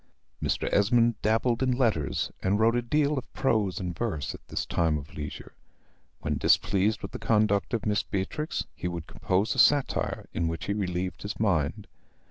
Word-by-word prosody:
Mr. - - 0
Esmond 115 +2 +3
dabbled 115 +3 +1
in 130 -1 +2
letters, 110 - 0
and 100 +2 +1
wrote 115 +2 +4
a 120 - +2
deal 145 +3 +1
of 125 - -13
prose 110 -8 +1
and 90 -2 -4
verse 100 - -2
at - - -10
this - - -3
time 80 -3 +1
of 75 -1 -9
leisure. 75 -1 -7 0.7
When - - -1
displeased 100 +2 +2
with - - -5
the - - -6
conduct 105 -3 +2
of 110 - -3
Miss 105 0 +2
Beatrix, 105 - -3
he - - -4
would 85 -2 -4
compose 95 +4 0
a 135 - -3
satire, 145 +1 +3
in 85 +1 0
which 80 -4 -3
he 100 - 0
relieved 90 -3 -2
his 100 - -5
mind. 90 -10 +1
105 Hz, 180 wpm, -28 LUFS, 90-115 Hz, 0.7 s, wrote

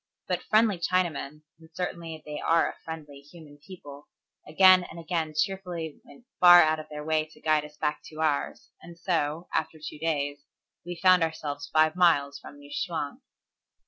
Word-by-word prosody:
But - - -1
friendly 215 -4 +2
Chinamen, 170 -4 -1 0.2
and 160 0 -17
certainly 170 -3 -5
they 150 0 -6
are 165 0 +2
a - - -6
friendly, 150 -3 -8
human 145 0 -16
people, 145 -3 -12 0.4
again 185 +3 +6
and 170 - -10
again 165 -2 -3
cheerfully 175 -4 -3
went 145 - -17 0.2
far 175 -1 +9
out 155 0 +1
of 155 - -10
their 150 0 -7
way 155 0 +1
to 155 - -20
guide 155 -1 +1
us 150 0 -15
back 150 -1 -2
to 155 - -11
ours, 155 -3 -2
and 170 0 -13
so, 165 -2 -2
after 160 - -2
two 150 0 -8
days, 145 -3 -2 0.4
we 175 +1 -6
found 185 +1 +4
ourselves 150 -3 -3
five 155 +1 +3
miles 145 -6 +2
from 145 - -13
New 145 0 -15
Chwang. 160 -4 -4
160 Hz, 175 wpm, -27 LUFS, 150-175 Hz, 0.4 s, far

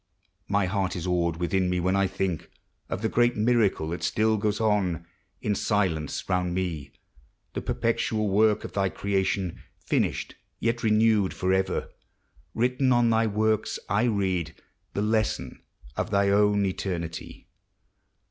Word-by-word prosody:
My 100 -1 +2
heart 95 0 -1
is 85 -1 -4
awed 85 -2 0
within 90 +2 0
me 90 0 0
when 90 +2 +1
I 100 0 +3
think 95 -4 -3 0.4
Of 90 +4 -4
the - - +3
great 120 +2 +2
miracle 105 -8 +2
thai 85 - -2
still 110 0 +1
goes 105 0 0
on, 100 -6 +1 0.4
In 105 - +1
silence, 95 -7 -1
round 90 -1 0
me, 80 -7 -3 0.6
the - - -3
perpetual 110 -2 0
wotU 105 +2 +3
Of - - -8
thy 100 -1 +1
creation, 95 -2 -1 0.2
finished, - - 0 0.3
yet 115 0 0
renewed 110 -2 +3
Forever. 95 0 0 0.7
Written 125 +2 +2
on 120 -1 +4
thy 115 0 +3
works 110 +1 0
I 105 +4 +2
read 95 -7 0 0.4
The 100 - 0
lesson 105 - -1 0.3
of - - -2
thy 100 -1 +2
own 100 0 +3
eternity. 85 -3 -4
100 Hz, 140 wpm, -26 LUFS, 90-110 Hz, 0.7 s, on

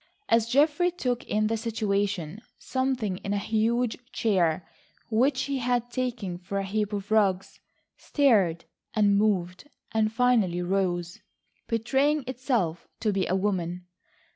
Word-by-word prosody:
As 230 -1 +3
Geoffrey 300 +7 +3
took 250 -9 -2
in 215 0 0
the 225 +1 +1
situation, 205 -5 -2 0.2
something 260 -7 -1
in 200 +2 -4
a - - +1
huge 225 +3 0
chair, 175 -6 +1 0.4
which 260 +4 +2
he 275 -1 -2
had 245 -1 0
taken 235 -8 -3
for 200 +2 -5
a 195 - 0
heap 210 +2 -1
of 205 0 -5
rugs, 195 -4 +1 0.4
stirred 205 - +2 0.3
and 205 -2 +4
moved, 200 +2 0 0.2
and 215 -1 +1
finally 225 -7 +2
rose, 175 -2 -1 0.5
betraying 270 +6 +1
itself 240 - -1
to 215 -2 +1
be 195 -1 0
a 185 - +1
woman. 180 -3 -1
215 Hz, 135 wpm, -27 LUFS, 190-245 Hz, 0.5 s, and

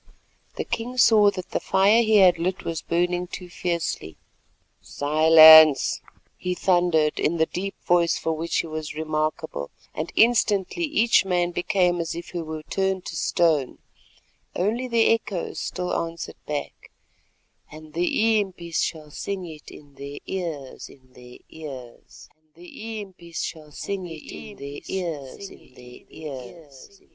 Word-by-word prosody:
The - - -3
king 235 +2 -4
saw 220 -4 +6
that 185 -2 -7
the - - 0
fire 200 +4 +4
he 220 -1 +2
had 185 -4 +6
lit 185 +2 -2
was 165 -1 -3
burning 175 +1 -1
too 180 0 -8
fiercely. 170 - -3 0.6
"Silence," 155 0 +7 0.4
he 180 0 -3
thundered 175 -5 +2
in 170 +2 +1
the 160 - +3
deep 195 +4 -5
voice 170 -1 +3
for 165 - -2
which 165 +2 -2
he - - -9
was 155 -1 -6
remarkable, 155 - -3 0.2
and 155 +2 -4
instantly 225 - +2
each 240 -9 +3
man 175 -2 0
became 175 0 +1
as 165 0 -4
if 170 - -7
he 175 - -4
were 155 -1 -6
turned 190 +2 -2
to - - -6
stone, 155 -6 +1 0.8
only 225 +7 -1
the 235 -2 +3
echoes 210 -5 -1
still 180 -1 -3
answered 165 0 -5
back: 150 -1 -5 0.8
"And 155 0 -12
the 215 +6 +2
impis 170 -4 -4
shall 155 -2 -4
sing 190 +4 -5
it 155 -3 -11
in 145 -1 -15
their 140 +1 -8
ears—in 140 -7 -7
their 125 0 -14
ears." 135 -7 -11
170 Hz, 120 wpm, -24 LUFS, 155-190 Hz, 0.8 s, Silence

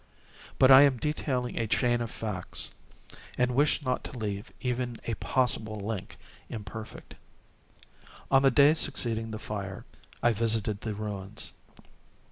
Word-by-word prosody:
But 130 0 +6
I 130 +1 +11
am 140 -3 +5
detailing 130 -3 -2
a 115 - 0
chain 120 +2 +2
of 115 - -3
facts—and 110 +4 -5
wish 145 +3 +2
not 125 0 -1
to 130 - -7
leave 105 -1 -4
even 125 -1 -2
a 115 - -1
possible 110 -3 0
link 100 -1 -5 0.3
imperfect. 110 0 -8 1.2
On 135 0 +6
the 135 - +5
day 140 +4 +6
succeeding 115 -7 0
the 110 - -5
fire, 100 -3 -6 0.4
I 120 - +4
visited 110 -2 +1
the 110 -2 -4
ruins. 105 0 -5
115 Hz, 130 wpm, -29 LUFS, 105-130 Hz, 1.2 s, I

